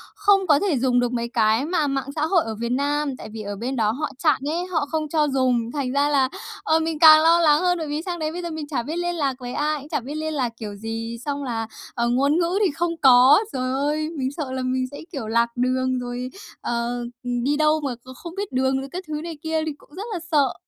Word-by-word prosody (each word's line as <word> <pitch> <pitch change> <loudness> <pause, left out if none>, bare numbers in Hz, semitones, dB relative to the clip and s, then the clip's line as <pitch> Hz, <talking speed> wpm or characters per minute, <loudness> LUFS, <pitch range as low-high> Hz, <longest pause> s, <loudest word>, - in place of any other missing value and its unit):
không 400 -3 +3
có 295 -2 +5
thể 360 -10 +1
dùng 250 -1 +2
được 245 0 0
mấy 235 -1 -1
cái 225 +3 +3
mà 320 -3 +1
mạng 275 0 -2
xã 305 0 +1
hội 340 0 +3
ở 220 -1 -4
Việt 235 +2 -3
Nam, 285 0 0
tại - - -9
vì 220 -1 -6
ở 205 0 -5
bên 250 +6 -3
đó 215 -2 +2
họ 300 +5 -3
chặn 305 - +4
ấy, 345 +3 -1
họ 320 -5 0
không 310 -2 -2
cho 305 -1 +2
dùng. 260 -3 +2
Thành 270 -4 -2
ra 285 +1 +2
là, 270 -3 +3 0.3
ờ, 320 +1 +3
mình 320 -1 -2
càng 310 -1 +9
lo 335 +1 +5
lắng 305 -2 +5
hơn, 355 -1 +2
bởi 320 -2 -4
vì 295 +2 -2
sang 345 -1 -4
đấy 310 0 -1
bây 355 +2 -5
giờ 340 - -4
mình 310 -2 -5
chả 275 -6 -2
biết 310 +6 -4
liên 350 0 -1
lạc 280 -4 0
với 245 0 -6
ai, 300 0 0
cũng 290 +3 -12
chả - - 0
biết 275 +5 -7
liên 315 0 -3
lạc 255 -5 0
kiểu 210 -2 -6
gì, 225 +2 -5
xong 285 -1 -2
là, 225 -3 -3 0.3
ờ, 235 0 0
ngôn 280 +6 +2
ngữ 355 +4 +1
thì 355 - +2
không 335 +2 -2
có. 260 +4 +7
Giời 255 0 -1
ơi, 300 +3 0
mình 260 0 -1
sợ 285 -3 -5
là 260 0 -2
mình 255 0 0
sẽ, 285 - -8
kiểu, 230 -6 -5
lạc 235 +1 +2
đường 255 +1 0
rồi, 245 +1 -4 0.3
ờ, 235 0 -1 0.4
ừm, 245 -1 -2
đi 290 +2 +1
đâu 310 0 +3
mà 265 -4 -2
kh 245 +2 -18
không 340 +5 -9
biết 405 0 -4
đường 265 +1 +1
rồi 270 +1 -6
các 365 +1 -5
thứ 305 0 -3
này 330 -3 -6
kia, 320 0 -1
thì 310 - -2
cũng 295 - -19
rất 395 - -5
là 355 - -2
sợ. 280 -4 +3
280 Hz, 270 wpm, -23 LUFS, 250-315 Hz, 0.4 s, càng